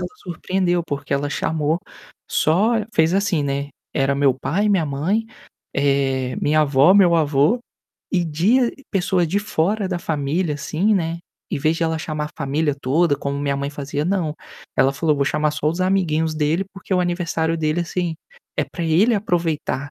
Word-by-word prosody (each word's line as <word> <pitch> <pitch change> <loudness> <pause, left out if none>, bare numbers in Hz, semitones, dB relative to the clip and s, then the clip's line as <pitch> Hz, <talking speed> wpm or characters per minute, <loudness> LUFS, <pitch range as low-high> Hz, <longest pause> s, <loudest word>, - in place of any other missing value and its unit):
ela - - -3
surpreendeu, 175 0 -1
porque 145 -1 -4
ela 140 +1 0
chamou 155 +2 0 0.5
só 190 +9 +3 0.2
fez 160 +1 +3
assim, 195 -5 +1
né, 140 0 -2 0.3
era 140 -1 +2
meu 140 -1 +3
pai, 185 +10 0
minha 190 -6 +2
mãe, 170 +11 -1 0.5
eh, 135 -2 +1
minha 155 +1 +3
avó, 145 +4 +5
meu 185 -4 +6
avô, 150 - +3 0.5
e 180 -3 +2
de 205 - +2 0.2
pessoas 180 -3 +1
de 195 - +1
fora 205 +1 0
da 180 -2 -2
família, 155 +1 -1
assim, 175 +8 0
né, 170 -3 -1 0.3
em - - -1
vez 155 +3 +1
de 170 - -2
ela 160 -1 0
chamar 155 -1 -3
a - - -10
família 145 +2 0
toda, 145 +3 +2
como 140 0 -3
minha 140 -1 -1
mãe 140 0 -2
fazia, 145 0 -3
não, 175 -4 0 0.4
ela 135 - +4
falou: 155 +2 +1
"Vou 140 - +1
chamar 150 +2 +1
só 150 0 -1
os 170 +4 -2
amiguinhos 165 -4 +1
dele, 155 +4 0
porque 195 0 -4
o 180 - +3
aniversário 170 -2 -1
dele, 155 +2 0
assim, 175 0 -2 0.4
é - - +1
para 175 - -7
ele 185 +9 +3
aproveitar". 165 -8 -1
160 Hz, 175 wpm, -21 LUFS, 145-180 Hz, 0.5 s, meu